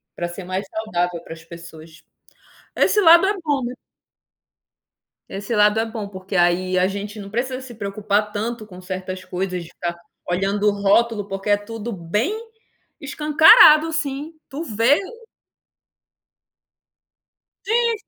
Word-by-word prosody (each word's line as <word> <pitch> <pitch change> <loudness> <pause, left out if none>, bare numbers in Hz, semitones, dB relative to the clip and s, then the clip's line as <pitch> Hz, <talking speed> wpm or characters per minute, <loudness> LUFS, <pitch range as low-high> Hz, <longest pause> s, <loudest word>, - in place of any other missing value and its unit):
pra 175 - -3
ser 175 +2 -8
mais 185 +2 -4
saudável 180 -6 -2
para - - -9
as 160 0 -13
pessoas. 165 -1 -13 0.7
Esse 420 - +3
lado 340 +1 +7
é 405 - +2
bom. 275 -5 -1 1.6
Esse 200 +4 -4
lado 210 +1 +4
é 225 - 0
bom, 220 -2 -6
porque 190 0 -8
aí 180 +1 +2
a 185 +1 +3
gente 205 +2 -6
não 200 0 -8
precisa 255 +4 -3
se 245 -3 -11
preocupar 205 0 -1
tanto 220 +2 -4
com 185 -3 -13
certas 185 0 -6
coisas, 185 -1 -4
de 165 - -13
ficar 170 0 -5 0.3
olhando 195 +3 0
o - - +5
rótulo 205 +1 +1
porque 195 +1 -5
é 205 - +4
tudo 225 +2 -7
bem 210 - -2 0.6
escancarado 305 +1 +6
assim, 310 -1 -3 0.2
tu 290 +5 -5
vê 230 +4 +2 2.7
Gente. 465 +2 +1
205 Hz, 135 wpm, -21 LUFS, 185-245 Hz, 2.7 s, lado